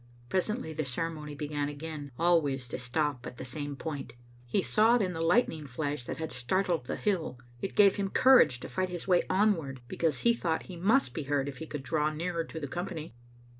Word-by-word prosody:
Presently 190 -2 -1
the 155 0 -2
ceremony 150 +2 -4
began 145 -1 -2
again, 145 -1 -6
always 150 -7 +2
to - - -4
stop 130 0 -1
at 125 - -9
the - - -6
same 145 +2 -4
point. 140 -5 -5 0.3
He 185 +10 +1
saw 220 +3 +4
it 245 - +3
in 180 -1 -1
the 165 - -4
lightning 165 - +2
flash 145 0 -3
that - - -4
had 160 -1 -4
startled 165 +4 0
the - - -2
hill. 180 -10 -1 0.2
It 195 - -4
gave 200 -1 +6
him 200 -1 -1
courage 255 - +6
to - - -6
fight 185 -1 -1
his 175 0 -5
way 180 -2 +5
onward, 185 -10 +2
because 160 +2 0
he 235 - +5
thought 170 -8 -1
he 185 - -9
must 215 +11 +2
be 155 - -4
heard 140 -1 0
if 135 -3 -6
he 160 - -6
could 150 -3 -5
draw 150 +3 +1
nearer 165 +2 -2
to 160 - -7
the 145 - -4
company. 170 -2 -5
160 Hz, 210 wpm, -30 LUFS, 145-180 Hz, 0.3 s, gave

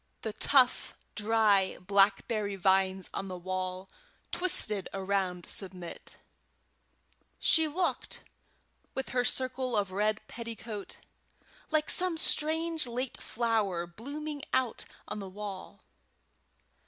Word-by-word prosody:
] - - -44
The 220 - -3
tough 255 +3 +3 0.2
dry 210 -3 +2
blackberry 200 +2 +2
vines 190 0 +2
on 195 - -4
the 185 -1 -5
wall 185 +1 -4 0.4
twisted 215 - +4
around 190 -2 -1
Submit; 180 -3 0 1.2
she 320 -1 +4
looked, 350 +4 -2 0.7
with 265 - -3
her 250 0 +1
circle 255 -1 0
of 200 -2 0
red 210 +2 +1
petticoat, 230 -3 -7 0.7
like 310 -1 +1
some 360 -2 +2
strange 320 -1 +2
late 245 +2 -4
flower 220 -7 0
blooming 285 - -6
out 260 -3 +1 0.2
on 210 - -4
the 195 -1 -6
wall. 200 -1 -8
210 Hz, 105 wpm, -30 LUFS, 190-260 Hz, 1.2 s, twisted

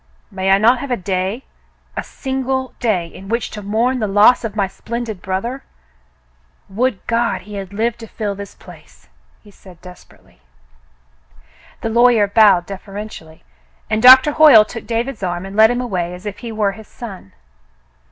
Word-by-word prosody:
May 190 -1 -2
I 195 - +6
not 235 +5 +3
have 280 - -6
a 245 - 0
day 190 +5 -3 0.3
— - - -38
a - - -2
single 265 -1 -4
day 210 -8 0
— - - -19
in 195 +1 -11
which 230 +1 -2
to 210 - -7
mourn 230 +6 0
the 215 - -1
loss 205 +6 +4
of 220 -2 -5
my 200 -2 +1
splen 235 +5 -6
did 215 -6 -7
brother? 230 +8 -4 1.1
Would 225 +1 -2
God 230 -5 0
he 210 +2 -12
had 195 -2 -6
lived 230 +3 -2
to 225 - -9
fill 210 -2 -4
this 200 0 -10
place! - - -17 0.2
" - - -37
he 205 - -17
said 185 -3 -17
desperately. 180 - -17 1.4
The 225 - -2
lawyer 235 -2 +4
bowed 200 -3 +4
deferentially, 195 -4 -9 0.5
and 215 - +1
Doctor 260 +4 +8
Hoyle 290 -8 +7
took 230 0 -9
David's 235 +1 -3
arm 175 -1 -3
and 195 +1 -9
led 220 +1 +6
him 245 +1 -1
away 180 -7 -3
as 180 +3 -14
if 205 -1 -6
he 235 -2 -7
were 215 -2 0
his 220 +2 -13
son. 195 - -10
215 Hz, 180 wpm, -18 LUFS, 195-240 Hz, 1.4 s, Doctor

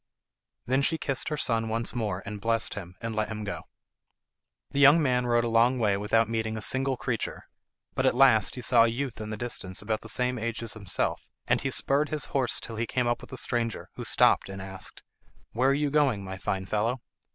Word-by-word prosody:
Then 130 +3 +1
she 160 +4 +1
kissed 135 -4 -1
her 150 - -2
son 115 -4 0
once 115 +1 -2
more, 105 -6 -2
and 105 0 -6
blessed 115 +3 +1
him, 90 -3 -8
and 115 -1 -4
let 110 -1 0
him 110 0 -5
go. 105 - -5 1.1
The 140 - -1
young 145 +3 +7
man 125 -4 +1
rode 120 0 +3
a - - -1
long 115 +3 +3
way 105 -4 +2
without 110 +3 +2
meeting 110 -1 -2
a - - -5
single 130 +2 +1
creature, 120 0 -3 0.5
but - - +1
at - - +2
last 125 -6 +5
he 125 - -6
saw 115 0 +5
a - - +2
youth 120 -1 -3
in 110 - -5
the 110 - -4
distance 100 -5 -3
about 110 +1 -2
the - - -5
same 125 -1 +1
age 115 +1 -3
as 115 - 0
himself, 105 -4 -2 0.2
and - - +1
he - - -1
spurred 145 +2 +2
his 150 -2 0
horse 130 -3 +1
till 115 - -7
he 115 +1 -1
came 125 +1 0
up 120 0 0
with - - -12
the 130 - -4
stranger, 115 -4 -2
who - - -7
stopped - - +3
and 95 0 -7
asked: 95 0 -8 0.5
"Where 130 +4 +2
are - - +4
you 145 0 0
going, 135 -9 +2
my 95 0 -7
fine 95 0 -2
fellow?" 115 +5 -1
115 Hz, 225 wpm, -27 LUFS, 110-130 Hz, 1.1 s, young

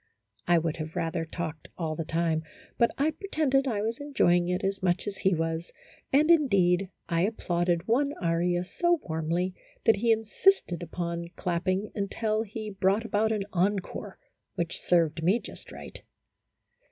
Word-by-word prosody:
I 175 0 +5
would 165 -1 -1
have 155 0 -6
rather 165 0 -1
talked 160 -2 -5
all 160 -3 -2
the 165 - -2
time, 165 0 0 0.4
but 235 - +5
I 295 +3 +2
pretended 305 -6 0
I 210 -5 0
was 225 +4 -2
enjoying 175 -12 +2
it 180 0 -1
as 195 0 -1
much 180 -1 +1
as 205 -2 -4
he 190 -2 +2
was, 165 +1 -2 0.4
and, 300 +4 +5
indeed, 195 - +4 0.2
I 165 -1 +1
applauded 175 -4 0
one 280 +5 +2
aria 175 +1 +1
so 345 - +1
warmly 165 +3 -1 0.3
that 225 -2 +5
he 230 +3 +2
insisted 225 - +2
upon 170 0 -4
clapping 185 +3 -1
until 215 +2 -1
he 215 0 -5
brought 195 +3 +1
about 220 0 +1
an 210 -2 0
encore 190 +2 -1 0.4
which 170 0 -3
served 165 -2 +2
me 185 +7 +4
just - - -11
right. - - -9
185 Hz, 155 wpm, -28 LUFS, 170-220 Hz, 0.4 s, I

